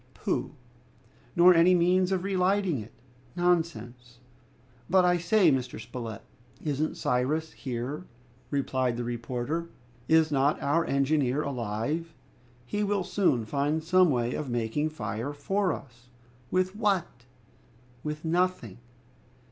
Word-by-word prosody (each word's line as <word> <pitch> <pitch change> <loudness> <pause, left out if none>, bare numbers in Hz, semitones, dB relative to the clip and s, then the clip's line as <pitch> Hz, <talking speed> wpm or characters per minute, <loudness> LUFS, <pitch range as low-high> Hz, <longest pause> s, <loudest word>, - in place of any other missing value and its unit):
"Pooh!" - - -2 0.8
"Nor 180 +1 +8
any 175 +2 +5
means 180 +2 +3
of 185 -2 0
relighting 190 -4 +1
it!" 110 +1 -9 0.4
"Nonsense!" 160 -9 -1 0.7
"But 185 0 +5
I 180 0 +4
say, 175 0 +4
Mr. 130 -3 -2
Spilett 115 -2 -7 0.2
" 120 - -24
"Isn't 150 +3 -2
Cyrus 150 +6 0
here?" 130 +6 -5 0.4
replied 130 -3 0
the 120 - -2
reporter. 120 +7 -3 0.4
"Is 160 -1 +4
not 140 +1 +2
our 155 +4 +1
engineer 140 0 +1
alive? 140 +6 -3 0.5
He 205 +11 -2
will 200 -2 0
soon 180 - +1
find 145 +6 -1
some 180 +1 +4
way 120 -3 0
of 150 -3 -4
making 120 +6 -1
fire 140 -3 -4
for 190 +6 0
us!" 125 -4 -9 0.4
"With 185 +1 0
what?" 195 - -1 0.8
"With 150 +1 -5
nothing." 170 - 0
150 Hz, 125 wpm, -28 LUFS, 125-180 Hz, 0.8 s, Nor